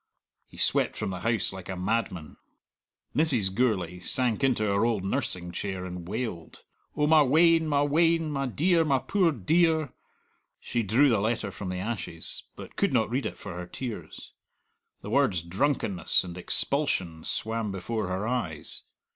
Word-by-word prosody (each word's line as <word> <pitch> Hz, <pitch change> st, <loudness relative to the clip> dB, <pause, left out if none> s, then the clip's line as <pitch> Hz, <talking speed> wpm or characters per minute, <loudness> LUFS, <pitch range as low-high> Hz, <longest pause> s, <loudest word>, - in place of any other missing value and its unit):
He -, -, -16 dB
swept -, -, +2 dB
from -, -, -2 dB
the 90 Hz, -, -5 dB
house 115 Hz, -1 st, 0 dB
like 95 Hz, -1 st, -9 dB
a 95 Hz, -, -3 dB
madman. 95 Hz, -4 st, -2 dB, 0.8 s
Mrs. 125 Hz, -12 st, +2 dB
Gourlay 95 Hz, -7 st, 0 dB
sank 120 Hz, +6 st, 0 dB
into 125 Hz, -5 st, +2 dB
her 100 Hz, 0 st, +2 dB
old 115 Hz, -5 st, +1 dB
nursing 90 Hz, -2 st, -1 dB
chair 95 Hz, 0 st, -4 dB
and 90 Hz, -1 st, -7 dB
wailed, 105 Hz, -5 st, -5 dB, 0.3 s
"Oh, 150 Hz, -, +3 dB
my 155 Hz, 0 st, +6 dB
wean, 160 Hz, +3 st, +4 dB
my 145 Hz, -1 st, +2 dB
wean; 165 Hz, +2 st, +2 dB
my 135 Hz, -2 st, -1 dB
dear, 165 Hz, +7 st, +2 dB
my 140 Hz, -4 st, +2 dB
poor 180 Hz, +5 st, +2 dB
dear!" 160 Hz, -, +2 dB, 0.7 s
She 120 Hz, -, -2 dB
drew 115 Hz, +8 st, +4 dB
the 115 Hz, -4 st, +3 dB
letter 110 Hz, -1 st, -1 dB
from 95 Hz, 0 st, -6 dB
the 90 Hz, -, -3 dB
ashes, 95 Hz, -5 st, -5 dB
but -, -, -11 dB
could -, -, +1 dB
not -, -, +2 dB
read -, -, 0 dB
it -, -, -7 dB
for -, -, -8 dB
her 90 Hz, 0 st, -6 dB
tears. 120 Hz, +2 st, -7 dB, 0.7 s
The -, -, -6 dB
words 85 Hz, -3 st, +2 dB
"drunkenness" 100 Hz, +1 st, +1 dB
and 90 Hz, -2 st, -8 dB
"expulsion" 90 Hz, -, -1 dB
swam 110 Hz, -1 st, -2 dB
before 95 Hz, +2 st, -3 dB
her 95 Hz, +4 st, -2 dB
eyes. 95 Hz, -12 st, -2 dB
110 Hz, 165 wpm, -27 LUFS, 90-140 Hz, 0.8 s, my